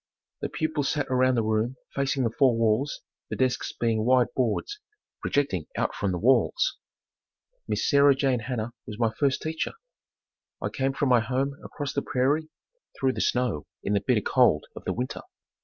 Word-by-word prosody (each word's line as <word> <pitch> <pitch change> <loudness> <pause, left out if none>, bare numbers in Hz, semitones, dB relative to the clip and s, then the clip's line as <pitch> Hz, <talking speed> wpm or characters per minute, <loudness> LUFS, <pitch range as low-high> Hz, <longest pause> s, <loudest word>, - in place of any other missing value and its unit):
The - - -2
pupils 155 -3 -1
sat 150 -2 0
around 130 0 +3
the 115 - +1
room 110 +3 0 0.2
facing 135 -1 0
the 115 - +1
four 120 0 +3
walls, 115 +6 +1 0.3
the - - -3
desks 130 -1 0
being 115 -2 0
wide 125 +1 +3
boards, 130 - -1 0.4
projecting 100 - 0
out - - 0
from 100 - -1
the 90 - -1
walls. 135 - +2 0.9
Miss - - 0
Sarah 140 -1 +6
Jane 135 -2 +1
Hanna 115 0 -4
was 105 - -7
my 115 -1 +1
first 135 +2 0
teacher. 160 0 -2 0.9
I - - -2
came 135 0 -1
from 135 0 0
my 125 -1 +6
home 130 +5 -1
across 145 -3 -5
the 140 - 0
prairie, 145 +6 0 0.5
through 130 -1 +2
the - - -3
snow 125 -12 0 0.2
in 100 - 0
the 100 - +2
bitter 120 -5 +2
cold 120 - +3
of - - -10
the - - 0
winter. 125 +2 -4
130 Hz, 175 wpm, -26 LUFS, 115-140 Hz, 0.9 s, Sarah